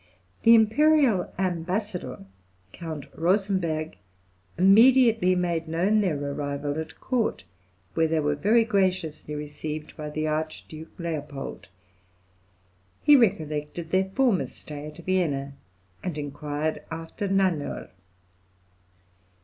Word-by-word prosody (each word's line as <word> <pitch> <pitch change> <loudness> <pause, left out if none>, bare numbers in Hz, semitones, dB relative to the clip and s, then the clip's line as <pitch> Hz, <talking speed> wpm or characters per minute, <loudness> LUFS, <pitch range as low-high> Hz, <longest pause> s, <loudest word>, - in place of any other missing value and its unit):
The 230 0 +8
imperial 230 - +4
ambassador, 180 - -3 0.5
Count 160 -4 -6
Rosenberg, 170 - 0 0.6
immediately 225 0 +6
made 170 -2 -1
known 185 +7 +2
their 180 -7 0
arrival 145 +1 -3
at 160 - -7
court, 250 -4 -1 0.5
where 160 0 +2
they 160 0 +1
were 150 -1 +1
very 215 +10 +3
graciously 185 -8 -1
received 150 +1 -6
by 150 -1 -6
the 155 +1 -2
Archduke 155 +1 -5
Leopold, 150 -5 -5 1.4
He 295 - +8
recollected 160 - 0
their 190 0 +3
former 235 -2 +2
stay 150 0 -9
at 150 - -11
Vienna, 145 -7 0 0.5
and 180 -5 -4
inquired 145 +1 -3
after 165 +5 -5
Nannerl. 190 -6 0
165 Hz, 100 wpm, -26 LUFS, 150-195 Hz, 1.4 s, The